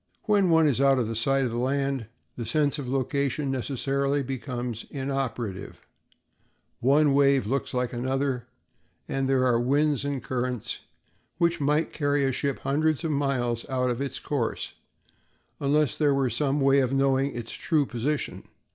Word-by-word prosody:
When 205 -4 +3
one 160 -1 +5
is 135 -2 +1
out 135 -1 +5
of 115 -2 -1
sight 135 +4 +2
of 120 - -2
land 135 0 -1 0.3
the 120 - -4
sense 145 +5 +1
of 130 -3 -5
location 135 +1 0
necessarily 140 +2 0
becomes 125 -3 -4
inoperative; 130 -7 -4 1.0
one 140 +3 +4
wave 140 -2 +4
looks 135 +5 -1
like 125 -1 -1
another, 130 0 -1 0.6
and 135 0 -1
there 130 -1 +3
are 120 -2 +3
winds 140 +3 +2
and 140 -2 -3
currents 125 -3 -3 0.6
which 170 -1 +1
might 150 +3 +1
carry 145 -1 +1
a 135 - +2
ship 140 +1 -2
hundreds 155 +3 +1
of 160 - 0
miles 130 -5 0
out 125 -1 +1
of 120 +2 -3
its 140 - -3
course 135 -6 -3 0.9
unless 145 0 +2
there 145 -2 +2
were 135 -3 +1
some 140 +4 0
way 135 0 +5
of 130 -2 +1
knowing 135 0 +2
its 115 -1 -5
true 155 -4 +1
position. 135 +5 -3
135 Hz, 155 wpm, -26 LUFS, 125-145 Hz, 1.0 s, one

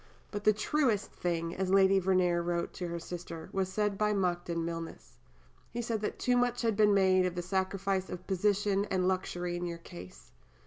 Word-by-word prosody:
But 205 0 -5
"the 215 - +7
truest 220 0 0
thing," 170 -1 -2
as 190 0 -1
Lady 195 0 +5
Verney 185 -1 +2
wrote 170 0 -1
to 180 - -4
her 170 0 -4
sister, 170 -1 -7
"was 190 -1 -1
said 210 0 0
by 210 0 +2
Monckton 175 -3 -1
Milnes. 165 -1 -7 0.5
He 240 - -4
said 225 -2 -2
that 210 - -3
too 250 - +1
much 245 0 +1
had 225 -2 +2
been 210 -1 +4
made 185 -1 +4
of 180 - -4
the 175 - -3
sacrifice 190 +1 -1
of 180 0 -7
position 200 +1 +1
and 185 -2 0
luxury 180 -2 -1
in 175 0 -3
your 170 -1 -4
case." 85 - -12
190 Hz, 190 wpm, -31 LUFS, 175-205 Hz, 0.5 s, the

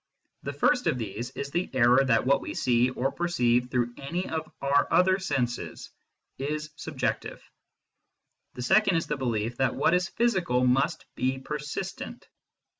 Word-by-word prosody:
The - - -5
first 265 -4 +2
of - - +2
these 115 +1 -4
is 140 0 -4
the 175 +4 -1
error 125 +2 +5
that 120 -3 +2
what 140 +1 +3
we - - -6
see, 125 0 +2
or 130 +2 -1
perceive 125 -8 +1
through 120 -1 0
any 170 +7 -3
of 160 -1 -4
our 140 +1 +2
other 185 +3 +4
senses, 125 -10 -3 0.5
is 150 +2 -3
subjective: 150 -3 -3 1.2
the 125 - -5
second 195 +5 +4
is 165 - -1
the 150 - -2
belief 120 -3 -2
that 135 - +1
what 145 - +2
is 180 0 +2
physical 185 - +1
must 130 +2 +1
be 130 +1 -1
persistent. 150 +7 -6
135 Hz, 155 wpm, -27 LUFS, 125-170 Hz, 1.2 s, error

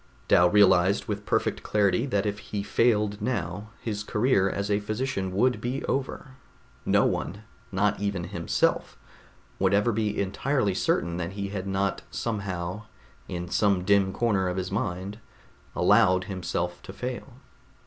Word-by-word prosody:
Dal 90 0 +5
realized 95 -1 +4
with 105 -1 -4
perfect - - 0
clarity 105 +3 +1
that 105 -5 0
if 100 -1 -2
he 100 0 -4
failed 105 -1 +1
now, 105 -3 -3
his 105 -2 -3
career 105 -2 +2
as 100 +2 -2
a 100 - +3
physician 105 -2 -2
would 125 +7 +1
be 125 +3 -3
over; 130 -1 -3 0.5
no - - +4
one, 105 +3 -2 0.3
not 100 +2 +1
even 100 -3 -2
himself, 85 -1 0 0.6
would 95 +1 +3
ever 105 +4 +3
be 105 -1 -1
entirely 100 +2 0
certain 85 -2 0
that 90 +1 -4
he 100 0 -4
had 100 -1 -4
not 95 0 -1
somehow, 100 -2 -4 0.4
in 90 0 -4
some 100 0 +2
dim 100 0 +3
corner 100 -3 +1
of 90 - -3
his 95 -1 -3
mind, 95 +4 -3 0.6
allowed 100 -4 +4
himself 90 -2 -3
to - - -9
fail. 125 +3 -5
100 Hz, 150 wpm, -27 LUFS, 95-105 Hz, 0.6 s, Dal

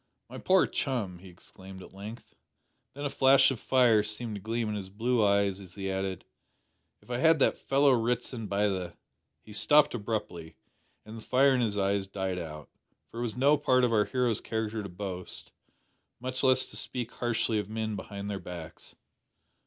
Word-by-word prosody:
"My - - -7
poor 185 0 +4
chum!" 110 -10 -3
he 95 +1 -13
exclaimed 95 +2 -13
at - - -14
length. 105 +4 -10 0.6
Then 145 +1 -5
a - - 0
flash 135 0 +5
of 125 - -4
fire 120 -4 +4
seemed 105 +2 -3
to 100 - -6
gleam 115 +2 -2
in 105 - -2
his 100 -3 -5
blue 115 +3 +1
eyes 100 -1 +2
as 95 -2 -11
he 95 -1 -3
added, 95 -1 -3 0.8
"If - - -12
I 120 - -1
had 160 +2 +5
that 140 - +2
fellow 140 +1 +3
Ritson 120 -1 -1
by 100 +1 +1
the 95 -3 -3 0.2
" - - -52
He 105 - -11
stopped 150 +7 +4
abruptly, 100 -8 -4 0.5
and 110 +1 -9
the - - -10
fire 135 +4 +4
in 125 - +2
the 100 0 -3
eyes 100 0 0
died 95 -2 -3
out, 75 -3 -8 0.4
for 115 - -7
it - - -2
was 120 -1 -3
no 140 +4 +4
part 130 -3 +3
of 120 -2 +2
our 105 -1 +3
hero's 125 -4 0
character 110 -1 -3
to 100 - -7
boast 90 0 -6 0.7
much 130 +1 -3
less 130 -1 +3
to - - -8
speak 125 -2 -4
harshly 115 -2 0
of 105 -1 -5
men 110 -1 -3
behind 100 -1 -7
their 100 -1 -3
backs. 85 -4 -10
110 Hz, 190 wpm, -29 LUFS, 95-125 Hz, 0.8 s, flash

